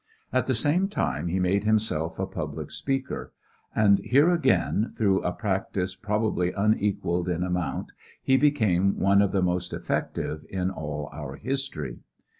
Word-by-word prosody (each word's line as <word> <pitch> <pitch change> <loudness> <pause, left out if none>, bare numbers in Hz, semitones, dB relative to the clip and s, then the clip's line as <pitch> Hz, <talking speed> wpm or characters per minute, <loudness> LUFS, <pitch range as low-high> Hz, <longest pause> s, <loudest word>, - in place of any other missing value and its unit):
At - - +1
the - - +2
same 170 +6 +2
time 75 - -1
he 90 +3 0
made 95 +2 +2
himself 105 -7 +1
a - - -1
public - - -5
speaker, 135 -1 -3 0.4
and 100 -3 +5
here 145 +7 +4
again, 110 - +2
through 100 -3 +2
a 90 - -1
practice 95 -2 -2
probably 105 -3 0
unequaled 100 -4 +1
in 90 0 0
amount, 90 -5 -2 0.3
he 130 - +4
became 110 -10 +3
one 100 +1 +4
of 100 - +2
the 95 -2 +1
most 90 0 -1
effective 75 0 -3
in 95 0 -1
all 75 -4 -5
our 75 -2 -6
history. 130 - -3
95 Hz, 150 wpm, -26 LUFS, 90-110 Hz, 0.4 s, and